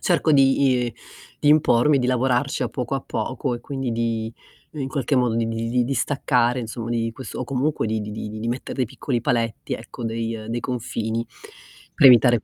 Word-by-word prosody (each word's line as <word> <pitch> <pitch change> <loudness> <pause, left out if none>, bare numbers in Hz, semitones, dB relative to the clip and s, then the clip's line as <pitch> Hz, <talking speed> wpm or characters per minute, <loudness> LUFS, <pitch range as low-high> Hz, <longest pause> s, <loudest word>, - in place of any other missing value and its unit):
cerco 170 -3 +2
di 135 -2 +4
i 115 - -6 0.5
di 145 - +2
impormi, 150 -2 +5
di 125 - 0
lavorarci 125 0 +1
a - - 0
poco - - -3
a - - -1
poco 125 - -3
e 120 - -7
quindi 135 -1 -4
di 115 -1 -1 0.4
in 140 -4 -4
qualche 140 0 0
modo 125 -3 +2
di 115 0 +1
di 115 0 -2
li 125 0 +2
di 135 - -1
staccare 125 -3 +1
insom 115 0 -5
di 115 -1 0
quest 130 +3 -9
o - - -3
comunque 135 +3 -1
di 110 0 -1
di 105 0 -5
di 110 0 -6
di 115 +2 -3
metter 125 +2 -4
dei 130 - +1
piccoli 120 +2 -3
paletti, 115 -1 -1
ecco, 120 - -6
dei 115 -1 -3
dei 120 +1 -2
confini 115 -2 -3 0.7
per - - +6
evitare 120 -2 +7
120 Hz, 200 wpm, -23 LUFS, 115-130 Hz, 0.7 s, evitare